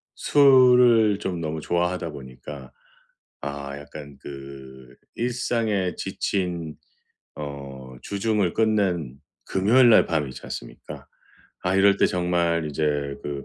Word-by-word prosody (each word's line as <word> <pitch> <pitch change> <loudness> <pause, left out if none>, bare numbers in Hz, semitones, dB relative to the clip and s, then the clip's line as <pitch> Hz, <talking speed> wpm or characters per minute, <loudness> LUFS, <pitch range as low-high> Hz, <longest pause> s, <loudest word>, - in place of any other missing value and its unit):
술을 125 -6 +5
좀 90 -4 -4
너무 80 0 -3
좋아하다 85 0 -1
보니까 65 -1 -10 0.7
아 70 0 -6
약간 70 -1 -11
그 65 -2 -11 0.2
일상에 115 -6 -1
지친 85 -5 -3 0.6
어 70 -3 -8
주중을 100 -3 0
끝낸 95 - 0 0.3
금요일 120 +6 +4
날 110 - +7
밤 75 -4 -1
있지 65 - -9
않습니까? - - -9 0.6
아 90 +1 0
이럴 100 0 +5
때 - - +5
정말 85 -2 0
이제 75 +2 -2 0.4
그 70 -1 -5
85 Hz, 210 characters per minute, -24 LUFS, 70-105 Hz, 0.7 s, 날